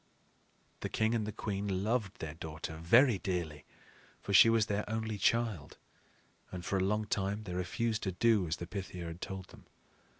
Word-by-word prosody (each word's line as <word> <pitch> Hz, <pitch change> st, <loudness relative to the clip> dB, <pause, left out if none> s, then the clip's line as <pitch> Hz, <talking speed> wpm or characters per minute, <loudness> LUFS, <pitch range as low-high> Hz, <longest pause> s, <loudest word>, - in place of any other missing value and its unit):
The -, -, -4 dB
king 110 Hz, +1 st, +1 dB
and 110 Hz, -3 st, 0 dB
the -, -, -2 dB
queen 100 Hz, -2 st, -2 dB
loved 110 Hz, -3 st, -1 dB
their 80 Hz, -2 st, -5 dB
daughter 80 Hz, 0 st, -6 dB
very 115 Hz, -, +5 dB
dearly, 85 Hz, -7 st, -3 dB, 0.5 s
for 100 Hz, -, -4 dB
she 105 Hz, +4 st, +9 dB
was 115 Hz, -1 st, +4 dB
their 105 Hz, 0 st, -1 dB
only 110 Hz, -1 st, -2 dB
child; 115 Hz, -11 st, 0 dB, 0.7 s
and 90 Hz, -1 st, -6 dB
for 100 Hz, -, 0 dB
a 95 Hz, -, +1 dB
long 105 Hz, +3 st, +1 dB
time 100 Hz, +1 st, -1 dB
they 90 Hz, -4 st, -6 dB
refused 110 Hz, +5 st, -1 dB
to 95 Hz, -, -1 dB
do 105 Hz, -1 st, +3 dB
as 80 Hz, -, -1 dB
the 85 Hz, -, -5 dB
Pythia 90 Hz, -2 st, -6 dB
had 85 Hz, +1 st, -7 dB
told 95 Hz, -1 st, -6 dB
them. -, -, -16 dB
100 Hz, 180 wpm, -33 LUFS, 90-110 Hz, 0.7 s, she